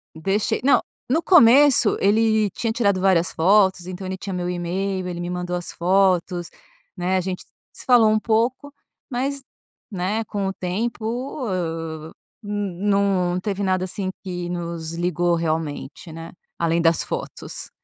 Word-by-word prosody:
Deixei. 195 +6 -1
Não, 275 - +5 0.3
no 315 +6 +1
começo 275 - +6
ele 215 +1 +3
tinha 230 +4 -2
tirado 200 -5 +1
várias 185 -2 +3
fotos, 190 0 +3
então, 185 +1 -6
ele 185 0 -3
tinha 195 0 -6
meu 180 -1 -3
e-mail, 185 +2 -2
ele 175 -1 -5
me 175 0 -4
mandou 180 0 -3
as 175 -1 -4
fotos, 180 -1 +1 0.5
né, 185 0 0
a - - +1
gente 180 0 -4 0.3
se - - -9
falou 240 -4 +6
um 215 - +2
pouco, 235 +6 0 0.4
mas, 275 +2 -2 0.5
né, 200 +4 -1
com 200 -1 -3
o 190 - -2
tempo, 225 +7 -3
ah, 165 -4 -4 0.3
hum, 205 -3 -4
num 190 -3 +1
teve 200 +1 -3
nada, 185 -1 +1
assim, 190 +1 -4
que 180 -2 -5
nos 170 -2 -4
ligou 175 0 0
realmente, 160 0 -3
né, 165 +1 -8 0.3
além 170 0 +1
das 165 0 +3
fotos. - - -5
185 Hz, 150 wpm, -22 LUFS, 175-210 Hz, 0.5 s, começo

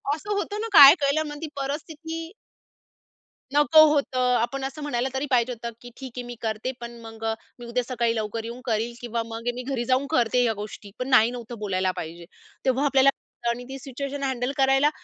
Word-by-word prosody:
असं 410 +7 -7
होतं 410 +1 -2
ना 450 - -2
काय 280 -5 +11
केलं 280 +3 +2
मग 295 - -7
ती 320 - -3
परिस्थिती. 320 +4 -5 1.2
नको 295 +2 +7
होतं. 275 -3 0 0.2
आपण 270 +3 -2
असं 295 +3 -6
म्हणायला 260 -3 -1
तरी 265 +2 -1
पाहिजे 245 0 +3
होतं 235 0 -6
की 245 - -10
ठीक 265 -2 -8
आहे, 250 - -3
मी 245 0 -7
करते 220 +3 -2
पण 235 - -6
मग 225 -1 -11 0.4
मी 240 - -8
उद्या 240 +1 -1
सकाळी 235 -2 0
लवकर 220 0 -3
येऊन 235 +2 -7
करील 230 0 -1
किंवा 235 -1 -2
मग 230 +1 -7
मी 250 - -5
घरी 255 -2 -2
जाऊन 260 +3 +2
करते 245 0 +3
या 230 -2 +2
गोष्टी 210 -1 -9
पण 255 - -2
नाही 240 -2 +5
नव्हतं 240 -1 -7
बोलायला 190 -3 0
पाहिजे. 170 +2 -7 0.4
तेव्हा 265 +2 +2
आपल्याला 275 -1 +5
कळतं 235 -3 -5
आणि 235 +1 -2
ती 270 - -6
सिच्युएशन 275 +2 -5
हँडल 260 -1 -1
करायला 270 +1 +4
250 Hz, 200 wpm, -25 LUFS, 235-275 Hz, 1.2 s, काय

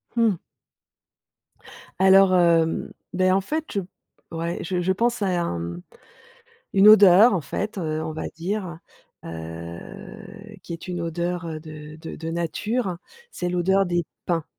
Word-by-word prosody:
Mmh. 225 -6 +3 1.6
Alors, 190 0 +6
hem, 165 -2 +2 0.2
beh, 185 0 +3
en 195 - +3
fait, 310 +10 -3
je 200 - 0 0.5
ouais, 170 +1 -4
je 180 +1 -2
je 180 +2 +1
pense 235 +3 0
à 180 -3 +1
un, 85 - -2
mmh, 85 +1 -5 0.9
une 195 +2 +6
odeur, 205 +1 +8
en 180 - 0
fait, 205 +8 -4
heu, 155 -3 -2
on 160 0 -4
va 155 - -5
dire, 175 0 -4 0.5
heu, 85 - -9 0.2
qui - - -10
est 165 +2 -7
une 175 -1 -3
odeur, 170 +1 -3
heu, 160 -2 -5
de 155 -1 -10
de 160 0 -8
de 165 0 -6
nature 185 +4 -2 0.3
c'est 180 - -3
l'odeur, 190 +2 +2
des 175 -2 -1 0.2
pins 165 -3 -1
175 Hz, 150 wpm, -24 LUFS, 165-195 Hz, 1.6 s, odeur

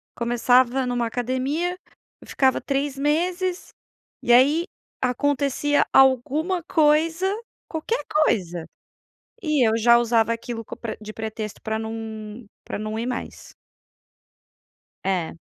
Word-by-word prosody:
começava 245 +2 +2
numa 245 -1 0
academia, 260 +9 -2 0.4
eu - - -15
ficava 265 -1 +2
3 275 0 -2
meses, 350 +6 -1 0.5
e - - +2
aí 285 +7 +5 0.4
acontecia 285 +3 +1
alguma 285 +7 +3
coisa, 320 +3 +2 0.4
qualquer 340 +9 -2
coisa 180 - +1 0.8
e 305 -7 +2
eu 220 - +2
já 235 +1 +6
usava 230 -1 +2
aquilo 230 0 -6
co - - -8 0.3
de 215 0 -8
pretexto 220 -1 -6
pra 220 0 -2
não 220 0 -6 0.2
pra - - -4
não 215 +1 -4
ir 230 - -2
mais. 250 - -6 1.5
É. 185 -4 -1
255 Hz, 110 wpm, -23 LUFS, 225-300 Hz, 1.5 s, já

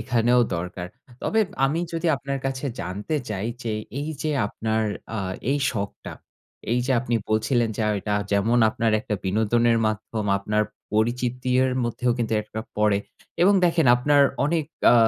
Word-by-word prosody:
এখানেও 120 +1 +3 0.2
দরকার। 90 +1 -5 0.3
তবে 220 - +2 0.2
আমি 150 +5 +1
যদি 165 +1 -2
আপনার 140 0 -4
কাছে 135 +1 -3 0.2
জানতে 100 +11 -4
চাই 105 0 -3 0.2
যে, 115 - -2 0.3
এই 145 - -3
যে 155 - 0 0.2
আপনার 110 +1 -1 0.3
আ - - -2 0.3
এই 145 - +2
শখটা। 100 -4 -5 0.6
এই 125 - +2
যে 135 - +2
আপনি 120 -1 -2
বলছিলেন, 110 +2 +2
যে - - -1 0.2
এটা 105 +1 -1 0.2
যেমন 110 +4 +3
আপনার 115 -1 0
একটা 105 - -3
বিনোদনের 115 +4 +2
মাধ্যম, 110 0 -3
আপনার 105 +2 0 0.3
পরিচিতির 125 +3 +1 0.2
মধ্যেও 120 +1 0
কিন্তু 115 -2 0
একটা 110 +1 -6 0.2
পড়ে 105 -1 +3 0.4
এবং 200 +3 +6
দেখেন 170 -3 +3
আপনার 145 +3 +4 0.2
অনেক 160 +1 +1 0.3
আ - - +6
115 Hz, 150 wpm, -24 LUFS, 105-130 Hz, 0.6 s, এবং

